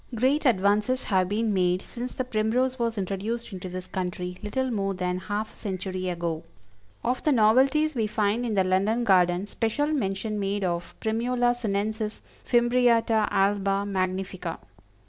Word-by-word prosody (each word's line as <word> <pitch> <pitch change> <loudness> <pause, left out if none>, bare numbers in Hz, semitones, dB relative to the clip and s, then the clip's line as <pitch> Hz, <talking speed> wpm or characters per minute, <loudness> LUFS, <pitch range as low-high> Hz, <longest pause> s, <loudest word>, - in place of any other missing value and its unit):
Great 270 +6 +2
advances 210 +4 +2
have 185 -4 +1
been 215 +1 0
made 180 -1 +1
since 245 +1 -6
the 255 - -3
Primrose 250 +3 0
was 230 -1 -1
introduced 205 +4 -3
into 185 0 -6
this 180 0 -6
country 180 -1 -4
little 255 +5 -1
more 195 -3 -1
than 180 0 -2
half 210 +3 -4
a - - -21
century 185 -2 -4
ago. 170 -2 -2 0.6
Of 245 +2 0
the 305 - +2
novelties 265 +7 +4
we 225 -5 0
find 210 +2 0
in 230 -3 -1
the 190 - +4
London 200 +6 +1
Garden 180 -2 +3
special 225 +7 -1
mention 215 -7 -1
made 200 0 -1
of 170 -1 -2
Primula 240 +2 +1
Sinensis 215 -1 -2 0.2
Fimbriata 240 -3 +3
Alba 195 0 +1
Magnifica. 190 -1 -2
210 Hz, 150 wpm, -26 LUFS, 190-240 Hz, 0.6 s, novelties